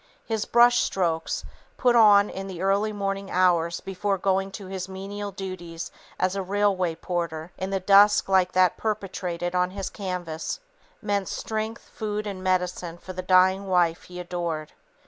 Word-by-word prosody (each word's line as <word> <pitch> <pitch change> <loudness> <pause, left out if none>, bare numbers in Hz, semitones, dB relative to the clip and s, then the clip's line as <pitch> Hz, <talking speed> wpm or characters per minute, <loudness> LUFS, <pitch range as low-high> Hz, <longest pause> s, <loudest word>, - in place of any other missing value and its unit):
His 220 -2 -2
brush 240 +1 +5
strokes, 165 -4 -1 0.3
put 245 -1 +3
on 210 -3 +6
in 195 0 -6
the 185 -2 -6
early 200 +2 +2
morning 195 -1 -3
hours 170 -2 +2
before 195 +1 -2
going 195 +1 +1
to 200 - -7
his 190 0 -5
menial 200 +2 -5
duties 180 -3 -6 0.3
as 185 +1 +1
a 195 - -1
railway 190 -3 +1
porter, 170 -2 -4
in 190 - -4
the 195 0 0
dusk 200 +2 +5
like 185 -1 +3
that 185 -1 +3
perpetuated 180 -5 -3
on 180 0 +2
his 195 +1 -5
canvas, 180 - -4 0.4
meant 200 -2 0
strength, 220 +1 -4
food 210 -1 -4
and 195 -2 -5
medicine 180 -2 -1
for 185 +2 -9
the 185 - -4
dying 185 +1 +4
wife 175 -3 +2
he 180 0 -9
adored. 170 -3 -4
190 Hz, 160 wpm, -25 LUFS, 180-200 Hz, 0.4 s, on